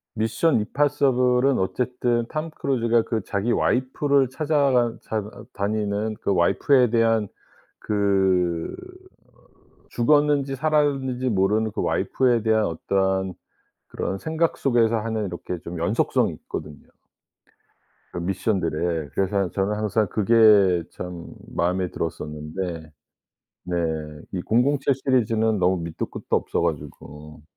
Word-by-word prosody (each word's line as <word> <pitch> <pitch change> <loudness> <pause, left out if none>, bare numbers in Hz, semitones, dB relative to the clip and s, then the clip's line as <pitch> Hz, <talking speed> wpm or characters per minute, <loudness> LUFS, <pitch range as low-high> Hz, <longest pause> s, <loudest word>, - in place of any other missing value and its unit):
미션 115 +6 +1
임파서블은 130 0 +2
어쨌든 120 +3 -1
톰 155 +1 -3
크루즈가 120 -6 +1
그 110 -1 -2
자기 100 +6 -1
와이프를 135 +2 +1
찾아가 140 -5 +2
삶 105 -2 -4 0.2
다니는 105 +1 -2
그 - - 0
와이프에 125 +8 +3
대한 115 -2 +2 0.5
그 95 -5 +1 1.2
죽었는지 145 +2 +2
살았는지 135 -4 0
모르는 105 +2 +1
그 - - -2
와이프에 125 -3 +1
대한 110 -1 +2
어떠한 95 +2 -1 0.5
그런 95 - -3
생각 160 - -1
속에서 120 -4 +2
하는 110 -1 -2
이렇게 90 0 -5
좀 85 +2 -7
연속성이 85 +7 +1
있거든요. 75 -1 -8 1.3
그 - - -5
미션들에. 85 -4 -1
그래서 95 0 0
저는 100 +4 -1
항상 105 0 0
그게 105 -4 +4
참 90 -2 -7 0.3
마음에 90 +1 0
들었었는데. 80 +1 -5 0.7
네. 90 -1 -3 0.6
이 95 - -2
007 135 +6 +2
시리즈는 115 -5 +1
너무 90 -1 +1
밑도 85 -1 -4
끝도 - - -2
없어 - - -1
가지고. 75 0 -6
110 Hz, 260 characters per minute, -23 LUFS, 95-125 Hz, 1.3 s, 그게